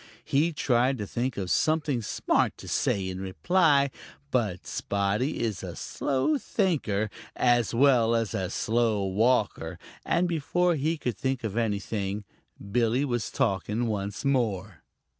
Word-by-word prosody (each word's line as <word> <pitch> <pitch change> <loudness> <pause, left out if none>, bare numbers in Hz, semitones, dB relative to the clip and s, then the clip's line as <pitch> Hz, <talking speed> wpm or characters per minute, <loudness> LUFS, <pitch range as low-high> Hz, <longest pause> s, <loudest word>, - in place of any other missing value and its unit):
He 155 +5 +2
tried 130 -3 +2
to 105 - -4
think 120 +5 -2
of 95 -2 -2
something 155 -5 +1
smart 105 - 0
to - - -11
say 95 -2 0
in 95 0 -5
reply, 140 - +3 0.4
but 105 -8 0
Spotty 100 +8 -1
is 110 -5 -2
a - - -6
slow 145 - 0
thinker 140 - 0 0.3
as 120 -2 +2
well 120 -3 +4
as 115 -2 0
a 95 -1 -2
slow 110 -3 +1
walker, 110 +7 +1 0.3
and 180 +1 +1
before 175 +2 +1
he 160 +2 0
could 125 -6 -3
think 130 -1 -1
of 110 -2 -3
anything, 105 -2 -2 0.5
Billy 120 +4 +2
was 120 -4 -2
talking 110 -1 0
once 105 +2 -3
more. 105 - 0
120 Hz, 140 wpm, -27 LUFS, 105-140 Hz, 0.5 s, well